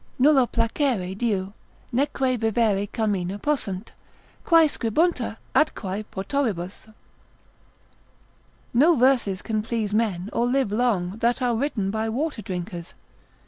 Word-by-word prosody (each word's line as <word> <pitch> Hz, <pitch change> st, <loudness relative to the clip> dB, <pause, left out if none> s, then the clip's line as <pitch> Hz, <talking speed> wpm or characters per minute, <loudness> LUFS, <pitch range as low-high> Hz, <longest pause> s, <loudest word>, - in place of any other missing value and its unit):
Nulla 270 Hz, -2 st, +5 dB
placere 230 Hz, -5 st, 0 dB
diu, 200 Hz, -3 st, -1 dB, 0.4 s
neque 260 Hz, 0 st, +1 dB
vivere 220 Hz, -3 st, +1 dB
carmina 200 Hz, -4 st, -1 dB
possunt, 215 Hz, -7 st, -2 dB, 0.5 s
Quae 330 Hz, -2 st, +6 dB
scribuntur 300 Hz, +7 st, 0 dB, 0.2 s
atquae 205 Hz, -8 st, 0 dB
potoribus.——— 200 Hz, -4 st, -3 dB, 1.9 s
No 305 Hz, +8 st, +5 dB
verses 245 Hz, -7 st, +2 dB
can 215 Hz, -2 st, -1 dB
please 220 Hz, -2 st, -2 dB
men 210 Hz, -3 st, 0 dB
or 235 Hz, -, +1 dB
live 255 Hz, -4 st, +1 dB
long 210 Hz, -5 st, 0 dB
that 235 Hz, +2 st, +1 dB
are 245 Hz, -2 st, +1 dB
written 225 Hz, -6 st, -1 dB
by 220 Hz, +1 st, -1 dB
water 275 Hz, +1 st, -2 dB
drinkers. 175 Hz, -3 st, -6 dB
225 Hz, 110 wpm, -24 LUFS, 195-255 Hz, 1.9 s, Quae